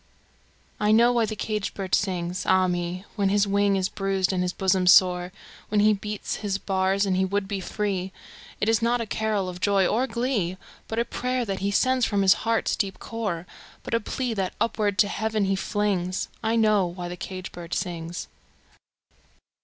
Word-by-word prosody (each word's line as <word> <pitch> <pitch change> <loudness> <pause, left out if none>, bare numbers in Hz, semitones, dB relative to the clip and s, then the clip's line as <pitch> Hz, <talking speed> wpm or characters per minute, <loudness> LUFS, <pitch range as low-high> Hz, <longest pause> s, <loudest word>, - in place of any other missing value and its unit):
I 210 0 +2
know 235 +3 +5
why 235 -2 +2
the 215 - -4
caged 215 -1 -3
bird 190 -2 -5
sings, 180 -2 0
ah 185 0 +4
me, 175 +1 -3
When 200 -3 +1
his 205 +1 +3
wing 200 0 +2
is 190 -1 +1
bruised 195 -1 -1
and 180 - 0
his 180 0 0
bosom 190 -1 +1
sore, 180 0 +5 0.4
When 210 - +2
he 215 +1 +5
beats 210 0 -4
his 200 -2 -2
bars 195 0 +1
and 190 -2 +1
he 190 - +2
would 195 +1 -1
be 200 -1 -3
free; 190 -1 -2 0.5
It 210 - 0
is 225 0 +3
not 240 +1 +2
a 230 - -2
carol 215 -3 -1
of 180 0 -7
joy 200 -2 +3
or 245 +8 +1
glee, 225 -7 -1 0.3
But 225 - -4
a 235 - +2
prayer 250 +1 -2
that 195 -3 -3
he 200 +1 0
sends 255 +5 +2
from 205 -3 +2
his 190 0 +7 0.2
heart's 230 - +1
deep 195 -3 -2
core, 205 -7 -4 0.4
But - - -6
a 230 - +3
plea, 245 +2 -3
that 190 -3 -2
upward 210 -3 0
to 205 - +5
Heaven 215 0 -1
he 195 0 +1
flings 190 -2 -1
I 225 0 0
know 215 -4 +3
why 175 0 -6
the 175 - -5
caged 185 +1 -7
bird 170 -1 -6
sings! 175 -2 -4
200 Hz, 195 wpm, -25 LUFS, 185-215 Hz, 0.5 s, his